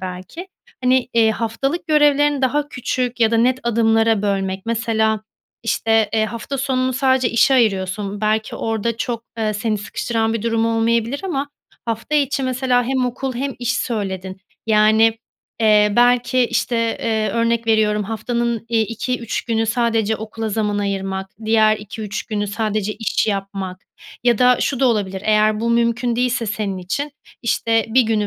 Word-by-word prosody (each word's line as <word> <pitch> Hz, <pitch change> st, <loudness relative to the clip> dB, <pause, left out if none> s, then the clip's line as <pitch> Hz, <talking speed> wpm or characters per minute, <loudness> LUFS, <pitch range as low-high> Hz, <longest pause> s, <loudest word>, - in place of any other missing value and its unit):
belki. 185 Hz, -, -7 dB, 0.4 s
Hani, 255 Hz, 0 st, +3 dB
eee, 225 Hz, -1 st, +4 dB
haftalık 270 Hz, +10 st, -2 dB
görevlerini 290 Hz, -2 st, +3 dB
daha 290 Hz, +3 st, +1 dB
küçük 250 Hz, -1 st, -3 dB
ya 225 Hz, -1 st, +4 dB
da 230 Hz, -, +2 dB
net 255 Hz, +3 st, +2 dB
adımlara 225 Hz, -2 st, +2 dB
bölmek 195 Hz, 0 st, -2 dB
mesela, 220 Hz, -2 st, 0 dB, 0.4 s
işte, 225 Hz, -1 st, +2 dB
eee, 220 Hz, -1 st, +2 dB
hafta 235 Hz, +5 st, -5 dB
sonunu 260 Hz, -1 st, 0 dB
sadece 260 Hz, -1 st, +2 dB
işe 235 Hz, +4 st, +4 dB
ayırıyorsun, 200 Hz, -3 st, 0 dB
belki, 215 Hz, 0 st, 0 dB
orada 225 Hz, 0 st, -2 dB
çok, 235 Hz, 0 st, -3 dB
eee, 215 Hz, -1 st, 0 dB
seni 215 Hz, +1 st, -1 dB
sıkıştıran 225 Hz, +2 st, -2 dB
bir 225 Hz, -, -2 dB
durum 230 Hz, 0 st, +1 dB
olmayabilir 230 Hz, +3 st, 0 dB
ama 285 Hz, -6 st, -2 dB, 0.4 s
hafta 230 Hz, +5 st, -3 dB
içi 280 Hz, -1 st, +1 dB
mesela 255 Hz, -1 st, +1 dB
hem 255 Hz, 0 st, 0 dB
okul 255 Hz, +2 st, -4 dB
hem 270 Hz, +2 st, -3 dB
iş 245 Hz, 0 st, -1 dB
söyledin, 190 Hz, -6 st, -3 dB, 0.3 s
yani, 220 Hz, +1 st, +4 dB, 0.4 s
eee, 210 Hz, -1 st, +4 dB
belki, 245 Hz, +1 st, +3 dB
işte, 240 Hz, +1 st, -1 dB, 0.2 s
eee, 220 Hz, -2 st, 0 dB
örnek 230 Hz, 0 st, 0 dB
veriyorum 215 Hz, -1 st, +2 dB
haftanın, 235 Hz, +2 st, -2 dB
iii, 230 Hz, -1 st, +2 dB
2-3 235 Hz, 0 st, -3 dB
günü 225 Hz, -1 st, 0 dB
sadece 225 Hz, -1 st, +1 dB
okula 220 Hz, +1 st, -5 dB
zaman 210 Hz, -1 st, -1 dB
ayırmak 195 Hz, -1 st, -2 dB, 0.2 s
diğer 215 Hz, -1 st, +4 dB
2-3 210 Hz, 0 st, -6 dB
günü 205 Hz, -2 st, -3 dB
sadece 215 Hz, 0 st, -2 dB
iş 225 Hz, 0 st, -1 dB
yapmak 195 Hz, -2 st, -3 dB, 0.4 s
ya 240 Hz, -3 st, +3 dB
da 250 Hz, 0 st, +5 dB
şu 270 Hz, -3 st, -1 dB
da 265 Hz, -, +4 dB
olabilir 195 Hz, -4 st, -1 dB
eğer 215 Hz, 0 st, +3 dB
bu 235 Hz, +1 st, 0 dB
mümkün 235 Hz, +1 st, +1 dB
değilse 245 Hz, -1 st, 0 dB
senin 205 Hz, -3 st, -3 dB
için, 280 Hz, +11 st, -3 dB, 0.3 s
işte, 230 Hz, -1 st, +1 dB
1 250 Hz, +3 st, +4 dB
günü 220 Hz, -2 st, 0 dB
225 Hz, 155 wpm, -20 LUFS, 215-245 Hz, 0.4 s, da